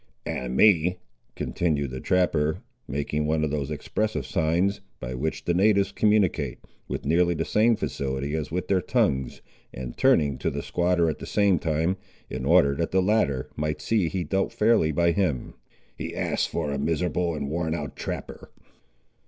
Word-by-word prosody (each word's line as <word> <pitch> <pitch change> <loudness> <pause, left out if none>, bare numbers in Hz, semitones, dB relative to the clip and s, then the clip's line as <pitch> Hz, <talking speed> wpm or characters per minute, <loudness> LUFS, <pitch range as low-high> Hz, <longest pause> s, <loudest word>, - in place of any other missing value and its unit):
"And 65 0 -3
me," 90 -4 +5 0.4
continued 75 -6 -1
the 65 - -5
trapper, 80 -4 +1 0.2
making 75 +1 -2
one 80 0 +1
of 75 - 0
those 75 -2 -2
expressive 75 0 -2
signs, 85 +9 +1 0.2
by - - -5
which 75 +6 -3
the 85 - +2
natives 100 +2 +3
communicate, 105 -4 +1 0.3
with - - -4
nearly 85 +3 +3
the - - -1
same 115 +2 +3
facility 70 -4 -3
as 80 -1 -2
with 90 +3 -3
their 95 -2 +2
tongues, 65 -5 0 0.3
and 60 -1 -7
turning 70 -3 +3
to - - 0
the - - -4
squatter 85 -1 +1
at 80 - -2
the - - -7
same 100 -4 +3
time, 80 +4 0 0.3
in 65 +1 -4
order 70 0 +5
that 85 - -1
the 95 - +2
latter 90 -10 +1
might 75 0 -2
see 105 -7 +1
he 95 0 -2
dealt 95 +5 0
fairly 105 -8 +3
by 85 +3 +2
him; 85 -9 -1 0.4
"he - - -6
asks - - 0
for 75 -3 -2
a 70 - -2
miserable 85 +3 0
and 70 -1 -4
worn 80 0 -1
out 75 -3 -5
trapper." - - -6
80 Hz, 170 wpm, -26 LUFS, 70-90 Hz, 0.4 s, me